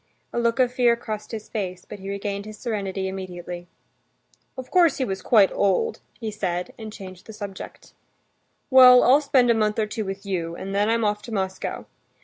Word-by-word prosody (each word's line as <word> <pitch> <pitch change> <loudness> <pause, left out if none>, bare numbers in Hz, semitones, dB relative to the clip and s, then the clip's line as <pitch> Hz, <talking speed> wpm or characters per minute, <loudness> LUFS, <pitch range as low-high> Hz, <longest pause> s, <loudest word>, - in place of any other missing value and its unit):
A - - 0
look 235 +2 +1
of 250 -1 +3
fear 245 -2 +3
crossed 215 -2 -6
his 220 -2 -6
face, 185 -4 -4
but - - -9
he 195 +1 -7
regained 200 0 -4
his 215 0 -9
serenity 195 -5 -3
immediately. 180 -2 -7 0.9
"Of 260 -1 -8
course 345 -5 +4
he 260 - 0
was 195 -3 -4
quite 210 -5 +5
old," 450 - +1 0.2
he 220 -3 -4
said, 180 -4 -3
and 220 -1 -8
changed 185 -4 -11
the 220 - -9
subject. 200 -2 -9 0.8
"Well, 255 -1 +9
I'll 275 +4 +6
spend 260 -4 +3
a - - +5
month 215 -2 0
or 220 - +2
two 215 +1 -4
with 195 0 -6
you, 170 -4 -3
and 195 +2 -6
then 205 +2 +2
I'm 230 -1 +1
off 210 0 0
to 230 - -10
Moscow. 190 -3 -3
210 Hz, 195 wpm, -24 LUFS, 190-235 Hz, 0.9 s, Well